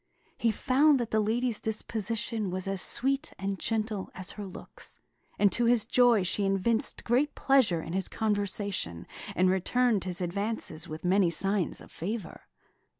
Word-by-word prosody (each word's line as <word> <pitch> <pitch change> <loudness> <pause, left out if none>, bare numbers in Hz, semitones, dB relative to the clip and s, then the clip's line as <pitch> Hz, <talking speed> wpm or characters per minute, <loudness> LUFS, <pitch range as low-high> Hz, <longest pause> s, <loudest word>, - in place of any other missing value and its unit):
He 235 - +2
found 270 +6 +3
that 235 -2 -3
the 220 - +2
lady's 225 +2 0
disposition 220 -1 -2
was 185 +1 -4
as 195 -1 0
sweet 270 +2 +1
and 195 0 -3
gentle 215 -3 -2
as 185 0 -2
her 205 -2 -7
looks; 185 - -5 0.4
and 205 -1 +4
to 240 +6 +2
his 235 -2 +3
joy 240 -3 +4
she 190 +3 +1
evinced 195 +4 +1
great 265 +5 +1
pleasure 230 -12 +3
in 165 - -6
his 190 -1 -1
conversation, 200 - -2 0.3
and 185 - +3
returned 210 +2 +1
his 180 -2 -2
advances 185 -3 -2
with 155 +3 -7
many 185 0 +4
signs 195 +1 -1
of - - -14
favour. 200 +1 -6
205 Hz, 155 wpm, -29 LUFS, 185-230 Hz, 0.4 s, and